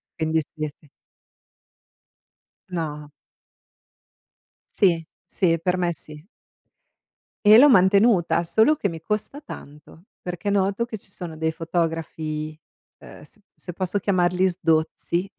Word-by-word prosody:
Quindi 160 0 0
sì, 155 -1 -3
è - - -4
se 150 - -24 1.8
No. 150 -4 -5 1.7
Sì, 170 -5 +3 0.2
sì, 170 -4 +1
per 180 0 +1
me 175 -1 0
sì. 150 +2 -11 1.2
E 215 +2 +9
l'ho 290 +3 +8
mantenuta, 190 -5 +4
solo 220 - +3
che 210 -9 -2
mi 165 -2 -7
costa 215 - -3
tanto, 150 - -12 0.2
perché 180 +3 -5
noto 200 +3 +1
che 220 - -6
ci 195 - -14
sono 170 -4 -7
dei 160 0 -1
fotografi, 160 -2 -3 0.4
uhm, - - -13
s 220 - -18 0.2
se 180 - -9
posso 185 +2 -1
chiamarli 180 -1 +2
"sdozzi" 170 +1 -1
175 Hz, 120 wpm, -23 LUFS, 160-195 Hz, 1.8 s, E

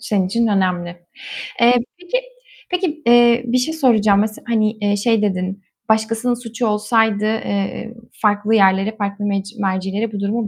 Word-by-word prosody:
Senin 195 -3 0
için 230 +5 0
önemli. 185 -4 0 0.7
Eee, 240 +1 +6 0.3
peki, 360 +7 -2 0.5
peki, 350 -4 -2
eee, 240 0 +5
bir 245 +2 +2
şey 285 +6 -1
soracağım. 220 -9 +3
Mesel 215 +1 -2
hani, 215 -2 0
şey 225 +1 +1
dedin: 190 -1 -2 0.3
"Başkasının 225 +2 +1
suçu 235 0 -4
olsaydı, 215 0 +1
eee, 215 0 -2 0.2
farklı 210 +1 +1
yerlere, 195 +1 +3
farklı 205 0 -3
mec 200 +1 -3
mercilere 195 +3 -2
bu 205 - -5
durumu 210 +3 -1
215 Hz, 145 wpm, -19 LUFS, 200-235 Hz, 0.7 s, Eee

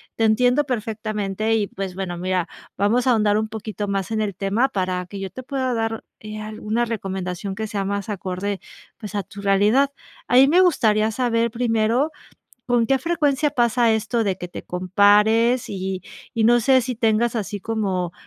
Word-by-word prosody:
te 225 - 0
entiendo 250 +6 +3
perfectamente 215 -3 -2
y 210 -3 0
pues 195 -2 -5
bueno, 185 -2 -4
mira, 185 -1 -1 0.3
vamos 215 +5 +2
a - - +5
ahondar 210 -2 +3
un 220 0 -1
poquito 215 -1 -5
más 195 +1 -2
en 220 -1 0
el 205 -2 -1
tema 205 +7 +1
para 185 -5 -2
que 200 +2 -8
yo 195 -1 -4
te 255 - -8
pueda 260 -2 -2
dar, 225 -1 -2 0.2
eh, 215 0 -7
alguna 215 +2 -2
recomendación 190 -3 -4
que 220 +2 -3
sea 200 -1 -2
más 200 0 -2
acorde, 195 0 -3 0.4
pues 210 -4 -8
a 200 - -1
tu 200 - -11
realidad. 205 +8 +3 0.4
A - - +2
mí 265 +2 +8
me 345 +6 +5
gustaría 220 -11 +3
saber 235 -1 0
primero, 235 +4 +1 0.6
¿con 240 -2 +2
qué 270 +1 +2
frecuencia 300 -2 +1
pasa 240 -3 +2
esto 225 +2 0
de 190 -2 -1
que 180 - -5
te - - -8
compares?, 210 +6 +3
y 190 -1 -4 0.3
y 225 - +1
no 240 +2 +5
sé 260 +2 +4
si 250 +1 -3
tengas 225 +1 +2
así 210 -1 -3
como, 190 -5 -2
215 Hz, 185 wpm, -22 LUFS, 195-240 Hz, 0.6 s, mí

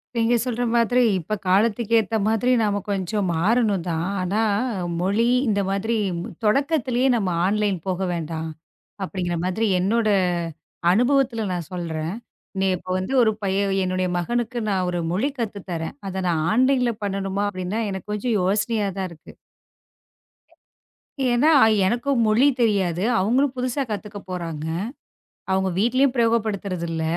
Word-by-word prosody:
நீங்கச் 230 0 +2
சொல்ற 245 -1 -1
மாதிரி 240 +2 +3 0.2
இப்ப 175 +6 -5
காலத்துக்கு 215 +4 +2
ஏத்த 220 +1 -1
மாதிரி 225 +3 +2
நாம 205 -2 +1
கொஞ்சம் 195 +1 -1
மாறணும் 205 0 +2
தான். 165 +1 -1 0.2
ஆனா 195 +4 0 0.6
மொழி 200 +5 +2 0.2
இந்த 205 -2 +2
மாதிரி 205 +4 -1 0.5
தொடக்கத்திலேயே 260 +1 +2
நாம 190 -6 0
ஆன்லைன் 205 -2 +1
போக 185 -1 -1
வேண்டாம், 160 -1 -4 0.6
அப்பிடிங்கிற 175 -2 -3
மாதிரி 200 +5 0
என்னோட 215 +4 +1 0.8
அனுபவத்துல 245 +1 +2
நான் 175 -4 -5
சொல்றேன். 165 -1 -3 0.5
நீ 195 - +2
இப்ப 185 - -13
வந்து 190 +8 -3
ஒரு 220 -2 +4
பையன் 195 +1 +1
என்னுடைய 185 0 0
மகனுக்கு 240 +7 -2
நான் 185 -2 0
ஒரு 175 -1 -2
மொழி 215 +11 0
கத்து 210 -4 -3
தரேன். 160 -3 -4
அத 190 0 -3
நான் 160 -3 +1
ஆன்லைன்ல 250 0 +3
பண்ணனுமா! 195 0 -1
அப்பிடின்னா 185 +3 -3
எனக்குக் 190 +2 -6
கொஞ்சம் 215 +2 0
யோசனையா 205 +2 +1
தான் 190 - -2
இருக்கு. 160 - -13 2.0
ஏன்னா, 260 +7 +4 0.3
எனக்கு 240 +7 0 0.2
மொழி 225 +6 +4
தெரியாது. 195 -6 +1 0.2
அவுங்களும் 250 +8 +2
புதுசா 255 +2 -1
கத்துக்கப்போறாங்க. 185 -7 -5 0.9
அவுங்க 190 0 +1
வீட்டிலும் 255 +4 +3
பிரயோகப்படுத்துறது 215 -6 0
இல்ல. 160 -1 -2
205 Hz, 130 wpm, -23 LUFS, 185-235 Hz, 2.0 s, ஒரு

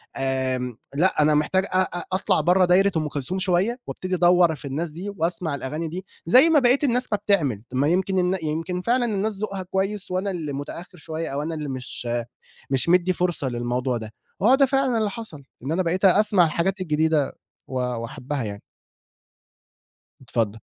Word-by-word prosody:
آآ، 130 -2 -1 0.2
لا 170 +2 +2
أنا 150 0 +4
محتاج 185 +6 +1
أ 185 -1 +1
أ 175 -2 -3
أطلع 185 - +2
برّه 180 +4 +4
دايرة 190 +3 +4
أم 155 -1 0
كلثوم 150 +6 -3
شوية 190 +6 +1
وأبتدي 185 0 -3
أدور 175 -2 +4
في 145 - -9
الناس 150 +4 -3
دي، 180 +6 -6
وأسمع 165 -2 -1
الأغاني 150 +4 -4
دي 180 +4 -6 0.2
زي 255 - +7
ما 320 -2 +5
بقيت 255 +2 +4
الناس 250 -2 +2
ما 210 - +2
بتعمل، 140 - +2
ما 135 +3 +2
يمكن 185 +1 +1
يمكن 165 +4 -2
فعلًا 245 +4 +1
الناس 210 -2 -1
ذوقها 195 -2 -4
كويس 190 +2 -2
وأنا 190 +2 -1
اللي 155 -5 -4
متأخر 165 +6 -7
شوية 160 +1 -5
أو 140 +1 -2
أنا 160 +2 -3
اللي 150 -2 -4
مش 125 -2 -5 0.6
مش 135 +3 +1
مدي 180 +1 +4
فرصة 175 -6 0
للموضوع 120 +1 -1
ده، 110 -1 -8 0.3
هو 235 +7 +6
ده 275 0 +5
فعلًا 270 -2 +1
اللي 215 -2 +1
حصل، 220 - -7 0.2
إن 135 - -3
أنا 180 +3 +1
بقيت 180 +3 0
أسمع 195 -1 +5
الحاجات 180 +4 -1
الجديدة 155 -3 +1 0.3
و - - -10
وأحبها 125 +2 -4
يعني. 100 -1 -6 1.6
اتفضل. 115 -4 -2
175 Hz, 175 wpm, -24 LUFS, 140-190 Hz, 1.6 s, زي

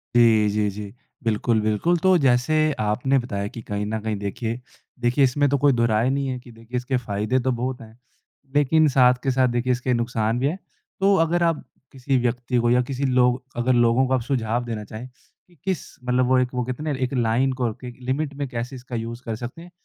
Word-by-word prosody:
जी, 110 -3 +5
जी, 105 0 +1
जी। 100 +1 -7 0.3
बिल्कुल, 110 0 +1
बिल्कुल। 110 +12 +1
तो 185 0 +4
जैसे 125 +4 +3 0.2
आपने 125 +6 +1
बताया 100 -5 -3
कि 115 - -6
कहीं 105 -1 -3
न 110 +1 -2
कहीं 110 0 -2
देखिए, 110 +4 -4 0.4
देखिए, 125 +3 +2
इसमें 145 +3 +3
तो 140 - +2
कोई 140 -2 +6
दो 115 - +4
राय 110 +4 +2
नहीं 140 0 0
है 130 -1 -2
कि 125 0 -15
देखिए 115 +2 -7
इसके 125 +1 -1
फ़ायदे 110 +2 -1
तो - - +4
बहुत 125 +1 -3
हैं। 110 0 -14 0.6
लेकिन 150 +2 +4
साथ 125 -2 +6
के 135 - +1
साथ 130 0 +3
देखिए 125 +1 0
इसके 125 +1 -1
नुकसान 120 -1 0
भी 135 - +1
हैं। 160 +6 -2 0.4
तो 195 +1 +4
अगर 170 +1 +1
आप 165 -2 +1 0.3
किसी 135 0 -1
व्यक्ति 125 +1 -1
को 120 0 +2
या 125 +1 +4
किसी 135 +1 -1
लोग 125 0 +2 0.2
अगर 130 +1 +3
लोगों 120 +2 +4
को 130 0 +2
सुझाव 120 -2 0
देना 115 -3 -4
चाहें, 115 +4 -6 0.4
कि 175 - -24
किस 190 -5 -1 0.2
मतलब 125 0 +2
वो 130 0 +4
एक 125 0 -1
वो 125 0 -1
कहते 130 +4 -5
ना, 155 - -1
एक 130 -1 -2
लाइन 125 +2 +2
को 115 -3 0
कि, 125 - -11
एक 120 - -10
लिमिट 140 +4 -2
में 140 0 -4
कैसे 125 +1 -5
इसका 125 -1 -8
लिमिट 115 +1 -4
कर 115 -2 -3
सकते 125 +7 -7
हैं। 175 - -13
125 Hz, 225 wpm, -23 LUFS, 115-135 Hz, 0.6 s, कोई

